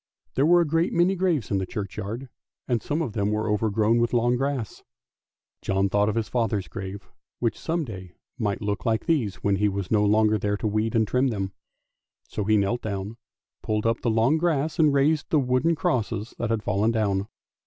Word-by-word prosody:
There 140 +3 +2
were 175 +1 +6
a - - +2
great 165 +4 +1
many 175 +3 +3
graves 175 - 0
in 100 - +2
the 95 - -2
churchyard, 105 +5 -5 0.4
and 120 -3 0
some 155 +3 -1
of 120 - -4
them 100 -1 0
were 110 +1 -1
overgrown 110 +2 +2
with 120 0 +1
long 120 +1 +3
grass. 135 -4 -3 0.8
John 95 0 +1
thought 105 +1 +2
of 105 - -2
his 115 -1 -1
father's 110 -5 -1
grave, 95 0 -7 0.3
which 115 -3 0
some 165 -1 -1
day 95 -6 -9 0.2
might 105 -3 -1
look 100 0 -2
like 110 -1 0
these 125 - +1
when 100 -1 +2
he 105 +1 +2
was 100 -2 -4
no 105 -1 +4
longer 105 +1 +3
there 105 +1 0
to 110 - -6
weed 110 +2 0
and 110 -1 +3
trim 130 +3 +1
it. 95 -3 -3 0.8
So 105 - -3
he 110 +1 +4
knelt 105 +4 0
down, 100 +1 -4 0.4
pulled 105 0 -1
up 115 0 +1
the 120 - 0
long 115 +8 +3
grass, 160 -1 0
and 155 -2 +5
raised 145 +2 +2
the 155 - +3
wooden 130 +5 +2
crosses 120 - -1
which 120 - -2
had 115 -2 -1
fallen 105 +2 +1
down. 105 -3 0
110 Hz, 205 wpm, -25 LUFS, 105-135 Hz, 0.8 s, were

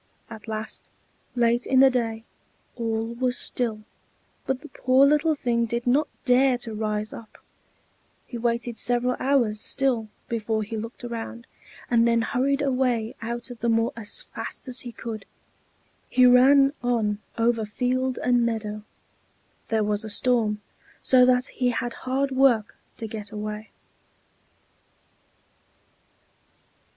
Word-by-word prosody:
At 220 0 -10
last, 220 0 -5 0.5
late 240 0 +2
in 260 - +4
the 270 -1 +7
day, 225 -3 -2 0.5
all 225 -1 -2
was 250 +1 0
still: 225 -4 -1 0.6
but 265 0 -1
the 305 - -10
poor 260 +2 +4
little 300 +2 +3
thing 235 -4 0
did 235 +1 -2
not 280 +5 +3 0.2
dare 255 0 +4
to 240 -2 -7
rise 215 0 -2
up; 225 -2 -11 0.9
he - - -9
waited 235 0 -1
several 245 +1 +3
hours 245 -6 +1
still 255 -5 +1 0.2
before 220 -1 -1
he 220 +2 -6
looked 225 +3 -7
around, 235 0 -6 0.4
and 235 -1 +3
then 230 -1 +2
hurried 275 +4 0
away 250 -4 0
out 235 +2 -5
of 240 - -10
the 235 - 0
moor 225 0 +2
as 220 -3 -3
fast - - -7
as 255 0 -2
he 245 - -5
could. 225 -3 -6 0.9
He 255 - +5
ran 270 +3 +6
on 225 -4 0 0.2
over 230 -1 +2
field 255 +4 -1
and 245 -1 +3
meadow; 215 -2 -2 0.9
there 220 -1 +1
was 210 +1 0
a 220 - -6
storm, 215 -2 +2 0.4
so 250 -1 +6
that 250 0 +3
he 250 0 -1
had 240 0 -2 0.2
hard 270 +1 0
work 260 -5 +3 0.2
to 225 - -5
get 215 -2 -5
away. 210 0 -5
235 Hz, 140 wpm, -25 LUFS, 220-255 Hz, 0.9 s, the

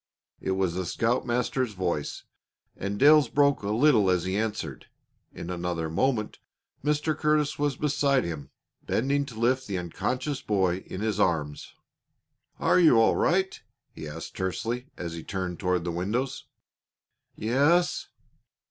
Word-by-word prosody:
It 95 - -1
was 95 -2 0
the 90 0 -3
scoutmaster's 120 +1 0
voice, 90 -6 -2 0.5
and 100 +1 -4
Dale's 145 0 +6
broke 140 +1 +3
a 100 - -3
little 110 -3 +4
as 90 -2 +2
he 95 +1 -2
answered. 105 -9 -3 0.4
In 85 - -7
another 85 -2 -3
moment 110 +3 0 0.4
Mr. 150 +1 +1
Curtis 150 -1 +1
was 145 -2 +1
beside 140 -3 +2
him, 75 -5 -5 0.3
bending 140 +4 0
to 115 - -10
lift 130 +3 +1
the 100 -2 -2
unconscious 125 - -3
boy 95 -4 +1
in 95 - -6
his 110 -2 -1
arms. 75 -6 -1 0.8
"Are - - +4
you 160 -9 +6
all 115 - +4
right?" 190 +2 +1 0.3
he - - -8
asked - - -8
tersely 115 +7 -3
as 85 -1 -5
he 85 -1 -7
turned 95 -3 -4
toward 90 -3 0
the 85 - -2
windows. 115 +10 -2 0.9
"Yes." 145 +10 +2
110 Hz, 140 wpm, -27 LUFS, 90-140 Hz, 0.9 s, Dale's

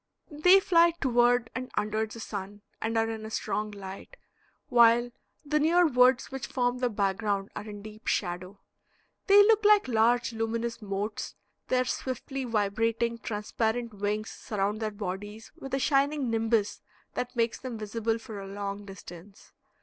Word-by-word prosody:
They 360 +6 +6
fly 340 -3 +4
toward 240 -2 +3
and 255 0 -5
under 215 +1 0
the 225 +2 -10
sun 205 -1 -7 0.2
and 225 +1 -1
are 225 0 +2
in 225 -1 -5
a 220 - -6
strong 215 -1 -2
light, 200 - -9 0.5
while 240 -1 +5 0.3
the 300 +1 +1
near 340 +4 +4
woods 255 -3 +4
which 265 -2 -5
form 245 -1 0
the 250 -1 +1
background 200 -1 -1
are 215 - -6
in 205 -1 -9
deep 215 +1 -12
shadow. 180 +1 -2 0.7
They 405 0 +8
look 435 0 +4
like 415 -4 +5
large 235 0 +2
luminous 230 +1 -2
motes. 205 +1 -4 0.3
Their 255 0 +2
swiftly 260 +1 -4
vibrating, 230 +1 0
transparent 225 +1 -2
wings 205 +1 -2
surround 205 0 -2
their 220 -1 -1
bodies 205 +1 -6
with 270 - -9
a - - -1
shining 275 -1 +1
nimbus 225 -2 0 0.3
that 250 +1 -4
makes 230 -1 0
them 255 -3 -6
visible 225 +1 -2
for 225 -3 -8
a 195 - -7
long 200 +1 -5
distance. 195 0 -12
225 Hz, 155 wpm, -28 LUFS, 205-250 Hz, 0.7 s, They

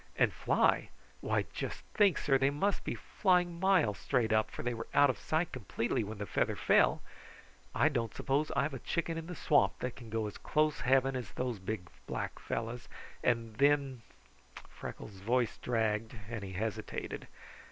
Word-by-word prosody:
And - - +3
fly? - - +2 0.3
Why, - - 0
just - - -4
think, 200 -6 +4
sir, 135 -2 +2
they 135 +1 +4
must 175 +8 0
be - - -2
flying 180 -3 +1
miles 185 - +3
straight 115 -5 +1
up, 110 0 +3
for - - -7
they 120 0 0
were 115 -1 -5
out 145 -2 +7
of - - -10
sight 160 +2 0
completely 115 0 -1
when 105 +1 -6
the 100 - -4
feather - - 0
fell. - - +3 0.7
I 140 - +4
don't 120 -7 0
suppose 145 +3 0
I've 140 +1 +1
a 135 - -4
chicken 170 +4 -2
in 165 0 -5
the 180 - -6
swamp 115 -13 +3
that 125 -1 -4
can 120 -3 -11
go 110 0 -1
as 105 - -6
close 155 -1 +1
heaven 135 +1 +3
as 125 -2 -5
those 125 -4 -2
big, 95 -1 -4 0.2
black - - -4
fellows, 115 +1 -4 0.4
and 115 -3 0
then 140 -2 +3 0.3
" - - -30 0.2
Freckles' 100 -3 -8
voice 120 +3 +1
dragged 110 -1 0 0.2
and 115 -3 -4
he 95 -1 -6
hesitated. 110 +2 -4
125 Hz, 180 wpm, -33 LUFS, 110-145 Hz, 0.7 s, out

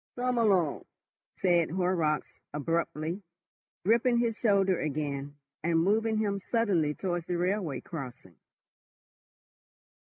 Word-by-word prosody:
"Come 250 0 0
along," 190 -9 +2 0.5
said 175 -3 +3
Horrocks 175 -4 0 0.2
abruptly, 165 +3 -1 0.6
gripping 235 +3 +4
his 235 -2 +1
shoulder 195 -5 +2
again, 145 -1 -3 0.3
and 170 0 +2
moving 215 +6 +2
him 205 -2 0
suddenly 185 -9 +1
towards 175 -3 -3
the 175 - -1
railway 175 - -1
crossing. 130 - -8
175 Hz, 100 wpm, -29 LUFS, 155-210 Hz, 0.6 s, gripping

